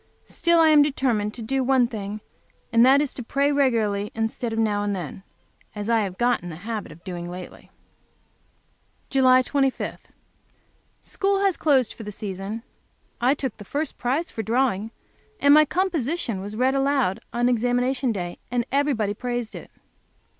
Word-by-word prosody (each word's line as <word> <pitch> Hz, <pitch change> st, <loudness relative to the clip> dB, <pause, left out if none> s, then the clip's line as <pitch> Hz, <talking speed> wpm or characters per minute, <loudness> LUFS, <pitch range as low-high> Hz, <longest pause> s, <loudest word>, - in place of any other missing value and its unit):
Still, 340 Hz, -1 st, +2 dB
I 320 Hz, -1 st, +6 dB
am 300 Hz, -1 st, +7 dB
determined 255 Hz, -7 st, +1 dB
to 235 Hz, -, -7 dB
do 265 Hz, +4 st, 0 dB
one 260 Hz, -1 st, +4 dB
thing, 210 Hz, -2 st, -5 dB, 0.5 s
and 230 Hz, 0 st, +6 dB
that 270 Hz, +3 st, +6 dB
is 290 Hz, -, -4 dB
to -, -, -6 dB
pray, 280 Hz, +4 st, +1 dB
regularly 220 Hz, -7 st, +1 dB
instead 225 Hz, +1 st, -2 dB
of 225 Hz, -, -3 dB
now 210 Hz, -2 st, +1 dB
and 205 Hz, -1 st, -1 dB
then, 180 Hz, 0 st, -6 dB, 0.5 s
as 210 Hz, +2 st, -3 dB
I 230 Hz, -, +4 dB
have 190 Hz, -3 st, -3 dB
got 245 Hz, 0 st, +2 dB
the 175 Hz, -2 st, -7 dB
habit 210 Hz, +3 st, -5 dB
of 155 Hz, +2 st, -15 dB
doing 175 Hz, -2 st, -6 dB
lately. 180 Hz, 0 st, -10 dB, 1.4 s
July 255 Hz, -1 st, +5 dB
25. 270 Hz, 0 st, -1 dB, 1.0 s
School 395 Hz, 0 st, 0 dB
has 390 Hz, -3 st, +2 dB
closed 270 Hz, -6 st, +2 dB
for -, -, -11 dB
the 210 Hz, -1 st, -6 dB
season. 200 Hz, +2 st, -5 dB, 0.6 s
I 255 Hz, +4 st, +3 dB
took 265 Hz, -5 st, -4 dB
the 210 Hz, -, -10 dB
first 290 Hz, +9 st, -3 dB
prize 275 Hz, +8 st, -1 dB
for 225 Hz, -, -4 dB
drawing, 225 Hz, -2 st, 0 dB, 0.5 s
and 285 Hz, 0 st, +6 dB
my 305 Hz, +1 st, +7 dB
composition 315 Hz, -, -1 dB
was 205 Hz, +2 st, -6 dB
read 260 Hz, +2 st, +2 dB
aloud 270 Hz, -8 st, +1 dB
on 240 Hz, +1 st, +1 dB
examination 245 Hz, +2 st, +1 dB
day, 175 Hz, -4 st, -5 dB
and 240 Hz, -1 st, 0 dB
everybody 265 Hz, -7 st, +1 dB
praised 240 Hz, 0 st, -4 dB
it. -, -, -9 dB
240 Hz, 165 wpm, -24 LUFS, 210-275 Hz, 1.4 s, am